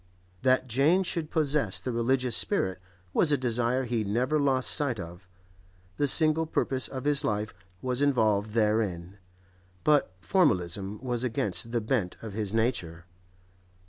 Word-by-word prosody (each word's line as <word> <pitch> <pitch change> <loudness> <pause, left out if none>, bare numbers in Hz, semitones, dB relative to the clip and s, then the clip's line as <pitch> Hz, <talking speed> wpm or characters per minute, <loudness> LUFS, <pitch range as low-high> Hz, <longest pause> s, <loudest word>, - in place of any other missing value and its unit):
That 130 0 +2
Jane 145 - +3
should 170 -3 -3
possess 145 - 0
the 130 - -4
religious 125 +1 +1
spirit 95 - +1 0.3
was 155 - +3
a 145 - +3
desire 125 +1 0
he 120 -3 -1
never 125 +9 0
lost 135 -3 +2
sight 140 -7 +1
of; 90 +2 -10 0.7
the 145 - +1
single 155 +2 +4
purpose 130 -4 0
of 130 -2 -7
his 145 -1 +2
life 105 0 -2 0.3
was 125 +1 -1
involved 110 -7 +1
therein; 105 -4 -1 0.6
but 150 -9 +3
formalism 100 - 0
was 125 -1 -1
against 115 -2 -1
the 120 -1 0
bent 110 -5 -1
of 110 -3 -7
his 105 -2 -3
nature. 95 -8 -1
120 Hz, 145 wpm, -27 LUFS, 105-140 Hz, 0.7 s, single